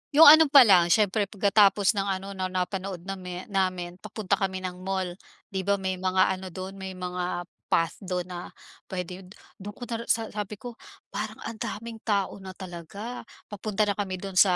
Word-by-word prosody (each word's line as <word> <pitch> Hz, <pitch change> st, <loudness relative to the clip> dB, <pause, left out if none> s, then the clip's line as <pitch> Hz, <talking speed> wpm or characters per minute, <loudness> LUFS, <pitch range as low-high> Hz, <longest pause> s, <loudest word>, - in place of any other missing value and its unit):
'Yong 320 Hz, -, +9 dB, 0.2 s
ano 320 Hz, -, +7 dB
pa 280 Hz, -1 st, +9 dB
lang, 185 Hz, -6 st, +6 dB
siyempre 205 Hz, +2 st, +3 dB
pagkatapos 200 Hz, -1 st, +4 dB
ng 200 Hz, -2 st, -2 dB
ano 195 Hz, 0 st, -3 dB
na 185 Hz, -1 st, -2 dB
napanood 185 Hz, 0 st, -3 dB
nami 185 Hz, -2 st, -6 dB
namin, 185 Hz, -2 st, -1 dB
papunta 210 Hz, -1 st, -2 dB
kami 190 Hz, -1 st, -2 dB
ng 180 Hz, -1 st, -5 dB
mall. 190 Hz, -1 st, -2 dB, 0.4 s
'Di 190 Hz, 0 st, -3 dB
ba, 200 Hz, -, +4 dB
may 190 Hz, -2 st, -3 dB
mga 185 Hz, 0 st, +3 dB
ano 190 Hz, 0 st, -4 dB
do'n, 185 Hz, +2 st, -7 dB
may 190 Hz, -1 st, -6 dB
mga 180 Hz, -1 st, -3 dB, 0.2 s
path 165 Hz, 0 st, +1 dB
do'n 180 Hz, -2 st, -2 dB
na 175 Hz, 0 st, -6 dB, 0.4 s
puwede 180 Hz, 0 st, -5 dB
'yon 185 Hz, -, -13 dB, 0.3 s
do'n 205 Hz, +2 st, -8 dB
ko 245 Hz, -, -9 dB
ta 230 Hz, -2 st, -3 dB
sa 225 Hz, -1 st, +1 dB
sabi 210 Hz, 0 st, -4 dB
ko, 235 Hz, +2 st, -9 dB, 0.3 s
"Parang 210 Hz, +2 st, -4 dB
ang 220 Hz, -2 st, -6 dB
daming 230 Hz, +1 st, -5 dB
tao 200 Hz, -2 st, 0 dB
na 190 Hz, -1 st, -9 dB
talaga." 190 Hz, +6 st, -8 dB, 0.2 s
Papunta 210 Hz, +1 st, -1 dB
na 205 Hz, -, +2 dB
kami 190 Hz, -2 st, -1 dB
do'n 190 Hz, 0 st, -2 dB
sa, 185 Hz, -3 st, +6 dB
190 Hz, 190 wpm, -27 LUFS, 185-205 Hz, 0.4 s, Yong